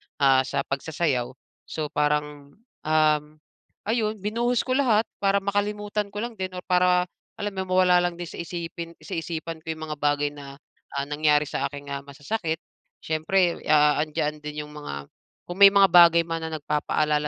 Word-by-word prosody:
ah, 135 -2 +4
sa 140 - -1
pagsasayaw. 140 -3 -1 0.4
So, 155 -2 -4
parang, 150 -1 -1 0.3
um, 155 -1 +3 0.6
ayun 220 0 0
binuhos 230 +4 0
ko 255 - -4
lahat 230 -6 +3 0.2
para 200 0 +2
makalimutan 205 +1 -1
ko 205 +2 -4
lang 235 -3 -6
din 185 -1 -4
or 180 - -6
para 180 0 +3 0.3
alam 205 0 -3
mo 190 -1 -2
mawala 180 -1 +5
lang 175 -1 -1
din 175 0 -6
sa - - -9
isipin 170 0 -6
sa - - -12
isipan 165 0 -4
ko 160 0 -5
yung 160 - -8
mga 150 - -4
bagay 145 0 +1
na, 140 -1 -10 0.4
ah, 140 - 0
nangyari 150 0 +2
sa 150 - -2
akin 140 0 -9
nga 140 - -2
masasakit. 160 +4 -4 0.4
Siyempre, 170 +3 +1
ah, 150 -1 +4
andiyan 150 0 -1
din 150 0 -6
yung - - -14
mga 145 - -7 0.5
kung 175 - -5
may 200 0 +9
mga 195 -1 +6
bagay 170 -1 +8
man 165 -1 -4
na 160 - -4
nagpapaalala 150 0 0
160 Hz, 175 wpm, -25 LUFS, 150-190 Hz, 0.6 s, may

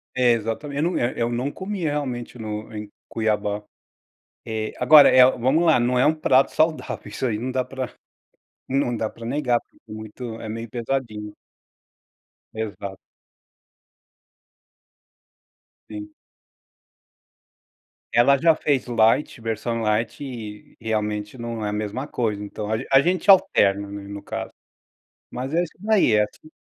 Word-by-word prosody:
É, 125 -2 +4
exatamente, 140 +7 -2
eu, 175 - 0
eh - - -1 0.2
eh - - -3
,eu 120 - 0
não 125 +4 -1
comi 195 0 -5
realmente 130 -5 -3
no 110 0 -6
em 105 -1 -6 0.2
Cuiabá. 105 -2 -1 0.8
Eh, 110 -1 -3
agora 145 +4 +8
é, 130 0 +7
vamos 135 +8 +1
lá, 155 -6 +5
não 125 +1 +2
é - - +4
um 155 - +5
prato 135 -3 +3
saudável, 155 0 0
isso 130 - -3
aí 110 -4 0
não 125 +3 -3
dá 130 -1 0
pra 130 -1 -5 0.8
não 130 -3 0
dá 110 0 -2
para 115 0 -10
negar, 125 -2 +1 0.3
porque 110 +3 -9 0.2
é - - -8
é - - -5
meio 115 0 -6
pesadinho. 115 -4 -3 1.2
Exato. 100 -3 -5 2.9
Sim. 310 0 -8 2.0
Ela 120 +4 +5
já 165 +2 +4
fez 145 -5 0
light, 115 +3 +2
versão 115 +1 -2
light, 110 +5 -1
e 110 -6 -8
realmente 105 0 -2
não 115 -2 -4
é - - -1
a - - -3
mesma 110 +7 -3
coisa, 105 -6 -2
então 105 +1 -6
a 110 - +1
a 135 0 +7
gente 185 +4 0
alterna 100 - +5
no 100 0 -7
caso. - - -5 0.8
Mas 130 +4 -5
é 175 +1 +3
isso 165 - -8
daí, 210 - +3
é 105 - +5
assi 155 +9 -10
120 Hz, 145 wpm, -23 LUFS, 110-135 Hz, 2.9 s, agora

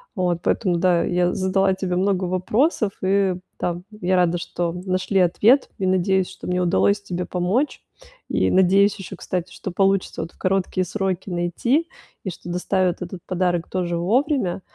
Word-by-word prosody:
Вот, 180 -3 0
поэтому, 180 -6 +1
да, 175 -1 +3
я 180 0 +1
задала 190 0 +2
тебе 185 -1 -2
много 190 0 +1
вопросов, 205 - +1
и 190 -1 +2 0.2
там 175 0 -3 0.2
я 185 +1 +2
рада, 175 -1 +2
что 170 0 -3
нашли 185 +1 0
ответ, 220 +10 +4
и 190 - 0
надеюсь, 190 0 +2
что 190 - -10
мне 180 0 0
удалось 200 +3 +2
тебе 180 -2 -4
помочь. 190 +11 -1 0.5
И - - +1
надеюсь 195 +2 +4
ещё, 190 0 -7
кстати, 180 0 -4
что 190 - -6
получится 195 -1 +1
вот 165 - -6
в - - -28
короткие 185 0 0
сроки 190 0 -2
найти, 185 - 0 0.4
и 190 - -1
что 175 0 -9
доставят 180 0 0
этот 180 0 -6
подарок 180 -2 -1
тоже 175 -2 -1
вовремя. 215 - +1
185 Hz, 165 wpm, -22 LUFS, 175-195 Hz, 0.5 s, ответ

